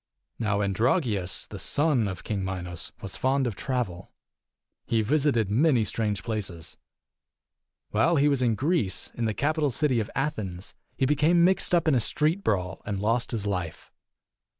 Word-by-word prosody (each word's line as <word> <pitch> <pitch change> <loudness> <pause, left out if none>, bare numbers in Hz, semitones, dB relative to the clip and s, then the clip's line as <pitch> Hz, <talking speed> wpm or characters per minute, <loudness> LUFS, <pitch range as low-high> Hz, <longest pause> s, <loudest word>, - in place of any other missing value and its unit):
ii. 115 - -2
Now 105 -1 +1
Androgeus, 105 - 0
the - - -8
son 145 -7 +2
of 95 -1 -6
King 100 -3 -2
Minos, 90 -3 -4
was 95 - -6
fond 135 +1 +1
of 115 -5 -2
travel. 110 -9 -3 0.8
He 115 -1 +1
visited 130 -5 +1
many 130 0 +3
strange 105 -3 -2
places. 100 -8 -4 1.2
While 140 +11 +3
he 145 -1 +4
was 140 -3 +2
in 120 -3 +2
Greece, 140 - 0
in 120 - -2
the 110 -2 -1
capital 150 +1 +1
city 130 -2 +1
of 105 - -3
Athens, 105 -10 -3 0.2
he 135 - +2
became 150 +5 +3
mixed 185 0 +3
up 170 -2 +1
in 155 - +4
a 130 - +4
street 155 - +1
brawl 90 -3 -1
and 100 -2 -3
lost 115 +4 0
his 110 -4 -3
life. 90 -5 -4
115 Hz, 165 wpm, -26 LUFS, 100-145 Hz, 1.2 s, he